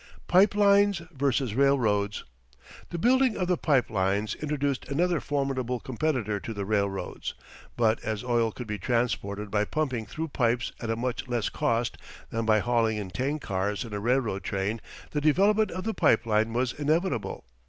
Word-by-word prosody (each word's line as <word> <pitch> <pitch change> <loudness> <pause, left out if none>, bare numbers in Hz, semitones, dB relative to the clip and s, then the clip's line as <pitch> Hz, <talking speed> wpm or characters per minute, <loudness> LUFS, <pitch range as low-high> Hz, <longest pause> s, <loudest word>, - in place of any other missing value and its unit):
PIPE 195 +3 +5
LINES 200 -3 +4
VS. 135 -4 0
RAILROADS 110 -6 +2 0.7
The 170 - -4
building 255 +5 +3
of 185 - -1
the 180 - +3
pipe 140 -8 +1
lines 100 +1 0
introduced 145 -3 -2
another 170 +4 +1
formidable 135 -3 -1
competitor 120 -5 -1
to 115 +2 -6
the 100 -1 -3
railroads, 100 -2 -2 0.4
but 115 -2 +3
as 110 0 -3
oil 120 -2 +1
could 125 - -7
be 105 -1 -4
transported 105 -3 -1
by 105 -1 +2
pumping 125 -3 -2
through 160 +8 -4
pipes 120 -3 0
at 115 - -5
a 115 - +1
much 125 +2 -3
less 120 -4 -1
cost 115 0 -1 0.3
than 115 0 -2
by 110 -1 +5
hauling 115 -2 +1
in 100 -3 -5
tank 140 +7 -2
cars 100 +2 -1
in 115 - -8
a 105 - -2
railroad 115 -3 0
train 100 +3 -2 0.3
the 150 - -1
development 200 +8 +3
of 185 - -5
the 225 - -1
pipe 110 - +3
line 110 0 +2
was 125 +1 0
inevitable. 150 - -1
120 Hz, 170 wpm, -27 LUFS, 110-150 Hz, 0.7 s, PIPE